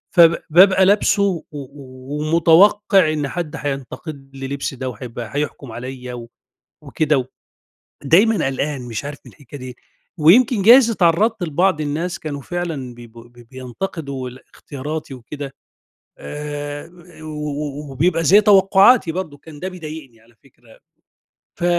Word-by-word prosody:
فب 170 Hz, -1 st, +6 dB
بابقى 190 Hz, +3 st, +6 dB
لابسُه 200 Hz, 0 st, +3 dB
و 185 Hz, -5 st, -1 dB
و 135 Hz, 0 st, -9 dB
ومتوقع 180 Hz, +1 st, +4 dB
إن 145 Hz, -2 st, -2 dB
حد 170 Hz, 0 st, -5 dB
هينتقد 135 Hz, 0 st, -6 dB
لي 135 Hz, 0 st, -6 dB
لبسي 140 Hz, -1 st, -4 dB
ده 130 Hz, 0 st, -4 dB
وهيبقى 115 Hz, 0 st, -8 dB
هيحكم 145 Hz, -4 st, -4 dB
عليّا 125 Hz, -1 st, -7 dB, 0.6 s
وكده، 150 Hz, -5 st, 0 dB, 0.8 s
ودايمًا 200 Hz, +6 st, +3 dB
قلقان 135 Hz, 0 st, -3 dB
مش 120 Hz, +1 st, -6 dB
عارف 145 Hz, 0 st, -7 dB
من -, -, -13 dB
الحكاية 145 Hz, 0 st, -12 dB
دي، 125 Hz, -1 st, -9 dB, 0.4 s
ويمكن 210 Hz, +7 st, +5 dB
جايز 235 Hz, +2 st, +7 dB
اتعرّضت 200 Hz, +2 st, +2 dB
لبعض 170 Hz, +1 st, +1 dB
الناس 165 Hz, +5 st, -3 dB
كانوا 145 Hz, -3 st, -6 dB
فعلًا 160 Hz, -8 st, -5 dB
بيب 120 Hz, -1 st, -14 dB, 0.4 s
بينتقدوا 135 Hz, 0 st, -6 dB
ال 130 Hz, -, -14 dB
اختياراتي 145 Hz, 0 st, -7 dB
وكده. 135 Hz, +3 st, -8 dB, 0.6 s
آآ، 145 Hz, -, -6 dB, 0.3 s
و -, -, -9 dB, 0.2 s
و 145 Hz, -1 st, -6 dB
وبيبقى 165 Hz, +4 st, +1 dB
زي 200 Hz, +7 st, +6 dB
توقعاتي 195 Hz, -1 st, +5 dB
برضك 160 Hz, -6 st, -6 dB
كان 155 Hz, -3 st, -13 dB
ده 185 Hz, -, -3 dB
بيضايقني 155 Hz, -9 st, -10 dB
على 115 Hz, +1 st, -25 dB
فكرة، 120 Hz, -4 st, -22 dB, 0.8 s
ف 175 Hz, -, -3 dB
150 Hz, 130 wpm, -19 LUFS, 135-175 Hz, 0.8 s, جايز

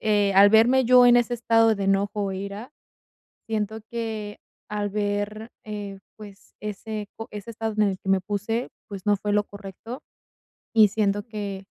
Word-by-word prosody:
eh, 205 Hz, -2 st, +2 dB
al 200 Hz, +1 st, +8 dB
verme 240 Hz, +4 st, +5 dB
yo 250 Hz, 0 st, +7 dB
en 245 Hz, -, +7 dB
ese 240 Hz, 0 st, 0 dB
estado 225 Hz, -1 st, +3 dB
de 200 Hz, -1 st, -3 dB
enojo 200 Hz, +1 st, +1 dB
o 195 Hz, -, -2 dB
ira, 200 Hz, +7 st, -6 dB, 0.7 s
siento 220 Hz, -1 st, -2 dB
que 220 Hz, -3 st, -4 dB, 0.3 s
al 205 Hz, -1 st, -2 dB
ver, 205 Hz, +2 st, -2 dB, 0.2 s
eh, 205 Hz, -2 st, -6 dB, 0.2 s
pues, 205 Hz, -2 st, -14 dB
ese 210 Hz, 0 st, -5 dB
po 225 Hz, -, -7 dB
ese 210 Hz, +2 st, -7 dB
estado 225 Hz, 0 st, -3 dB
en -, -, +5 dB
el 190 Hz, -1 st, -3 dB
que -, -, -9 dB
me 190 Hz, -1 st, +3 dB
puse, 210 Hz, +5 st, -2 dB, 0.2 s
pues, 200 Hz, -1 st, -8 dB
no 205 Hz, -, +4 dB
fue 205 Hz, +1 st, -3 dB
lo 210 Hz, 0 st, +2 dB
correcto, 205 Hz, +5 st, -9 dB, 0.7 s
y 215 Hz, -2 st, +6 dB
siento 205 Hz, 0 st, 0 dB
que, 205 Hz, -4 st, -6 dB
210 Hz, 175 wpm, -25 LUFS, 200-225 Hz, 0.7 s, al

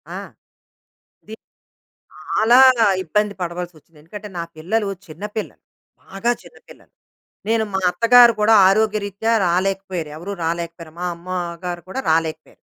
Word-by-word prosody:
ఆ! -, -, -4 dB, 1.1 s
ది 220 Hz, -, -8 dB, 0.8 s
చాలా 235 Hz, +3 st, +2 dB, 0.5 s
ఇబ్బంది 210 Hz, +4 st, 0 dB
పడవలసి 175 Hz, 0 st, -4 dB
వచ్చింది. 155 Hz, 0 st, -22 dB
ఎందుకంటే, 205 Hz, +7 st, -10 dB
నా 170 Hz, -, -2 dB
పిల్లలు 200 Hz, +6 st, -1 dB, 0.2 s
చిన్న 160 Hz, +4 st, -12 dB
పిల్లలు. 215 Hz, -, -5 dB, 0.4 s
బాగా 210 Hz, +5 st, -2 dB
చిన్న -, -, -17 dB
పిల్లలు. -, -, -17 dB, 0.6 s
నేను 225 Hz, 0 st, +2 dB
మా 190 Hz, -, +1 dB
అత్తగారు 235 Hz, +4 st, +6 dB
కూడా 220 Hz, +2 st, +5 dB
ఆరోగ్యరీత్యా 210 Hz, +1 st, 0 dB
రాలేకపోయారు. 185 Hz, -2 st, -1 dB
ఎవరూ 175 Hz, +6 st, -6 dB
రాలేకపోయారు. 170 Hz, -1 st, -4 dB
మా -, -, -3 dB
అమ్మగారు 175 Hz, 0 st, -5 dB
కూడా 260 Hz, +8 st, -4 dB
రాలేకపోయారు. 160 Hz, 0 st, -2 dB
185 Hz, 120 wpm, -20 LUFS, 170-215 Hz, 1.1 s, అత్తగారు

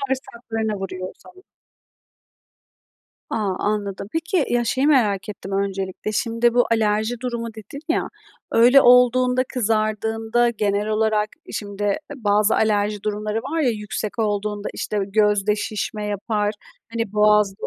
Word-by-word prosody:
Bağırsaklarına 235 Hz, -5 st, -3 dB
vuruyor 185 Hz, -1 st, -5 dB
o -, -, -11 dB
zaman. 370 Hz, +1 st, -17 dB, 1.9 s
A, -, -, -1 dB, 0.2 s
anladım. 205 Hz, -1 st, -2 dB
Peki, 325 Hz, -1 st, 0 dB
ya, 240 Hz, 0 st, +2 dB
şeyi 260 Hz, +4 st, +1 dB
merak 220 Hz, -9 st, +2 dB
ettim 195 Hz, -1 st, -7 dB
öncelikle. 195 Hz, +1 st, -2 dB
Şimdi, 230 Hz, +2 st, +1 dB
bu 245 Hz, -, +4 dB
alerji 220 Hz, +1 st, +1 dB
durumu 235 Hz, -2 st, -3 dB
dedin 220 Hz, +6 st, -9 dB
ya, 330 Hz, -, 0 dB, 0.4 s
öyle 245 Hz, +4 st, +7 dB
olduğunda 250 Hz, +1 st, +5 dB
kızardığında, 225 Hz, +1 st, +1 dB
genel 205 Hz, -1 st, -1 dB
olarak, 215 Hz, -1 st, +1 dB, 0.2 s
e, -, -, -10 dB
şimdi 205 Hz, -1 st, -2 dB, 0.2 s
bazı 210 Hz, -2 st, +2 dB
alerji 210 Hz, -1 st, +1 dB
durumları 210 Hz, +1 st, -2 dB
var 320 Hz, +7 st, -2 dB
ya, 255 Hz, -5 st, +3 dB
yüksek 210 Hz, 0 st, -4 dB
olduğunda, 210 Hz, -1 st, -1 dB
işte, 210 Hz, -, -3 dB
gözde 210 Hz, 0 st, +2 dB
şişme 210 Hz, 0 st, -3 dB
yapar, 210 Hz, +1 st, -1 dB, 0.4 s
hani, 230 Hz, -3 st, -2 dB
boğazda 210 Hz, -1 st, +3 dB
215 Hz, 130 wpm, -22 LUFS, 205-235 Hz, 1.9 s, öyle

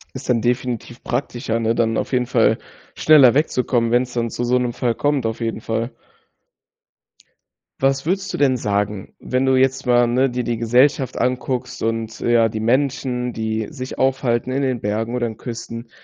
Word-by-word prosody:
Ist 130 Hz, +1 st, -7 dB
dann 120 Hz, -2 st, +2 dB
definitiv 120 Hz, 0 st, -2 dB
praktischer, 120 Hz, -4 st, -2 dB
ne? 115 Hz, +1 st, +1 dB
Dann 115 Hz, -1 st, +1 dB
auf -, -, -3 dB
jeden 125 Hz, -1 st, +1 dB
Fall -, -, +3 dB, 0.4 s
schneller 145 Hz, -6 st, +6 dB
wegzukommen, 125 Hz, -5 st, +1 dB
wenn's 125 Hz, +1 st, +2 dB
dann 115 Hz, -1 st, -1 dB
zu 120 Hz, -, -4 dB
so 125 Hz, +1 st, +2 dB
'nem 120 Hz, -1 st, -1 dB
Fall 120 Hz, -1 st, 0 dB
kommt 145 Hz, -2 st, 0 dB
auf 115 Hz, 0 st, -2 dB
jeden 115 Hz, -1 st, -3 dB
Fall. 115 Hz, +2 st, -2 dB, 1.9 s
Was 135 Hz, +1 st, +1 dB
würdest 190 Hz, +3 st, -1 dB
du -, -, -2 dB
denn 135 Hz, -3 st, +3 dB
sagen, 105 Hz, -2 st, -2 dB
wenn 130 Hz, +1 st, -1 dB
du 130 Hz, 0 st, +3 dB
jetzt 130 Hz, 0 st, +2 dB
mal, 120 Hz, 0 st, +5 dB
ne, 125 Hz, +3 st, +2 dB
dir 125 Hz, 0 st, -2 dB
die 120 Hz, 0 st, -2 dB
Gesellschaft 125 Hz, +3 st, +2 dB
anguckst 125 Hz, 0 st, -2 dB
und 115 Hz, 0 st, -2 dB
ja, 115 Hz, -1 st, +3 dB
die 110 Hz, -, -4 dB
Menschen, 125 Hz, 0 st, 0 dB
die 110 Hz, 0 st, -2 dB
sich 130 Hz, -4 st, -7 dB
aufhalten 130 Hz, -2 st, 0 dB
in 135 Hz, +2 st, 0 dB
den 130 Hz, -3 st, -1 dB
Bergen 110 Hz, +3 st, -2 dB
oder 125 Hz, -1 st, 0 dB
in 110 Hz, -2 st, -7 dB
Küsten, 115 Hz, -1 st, -7 dB
120 Hz, 180 wpm, -20 LUFS, 115-130 Hz, 1.9 s, schneller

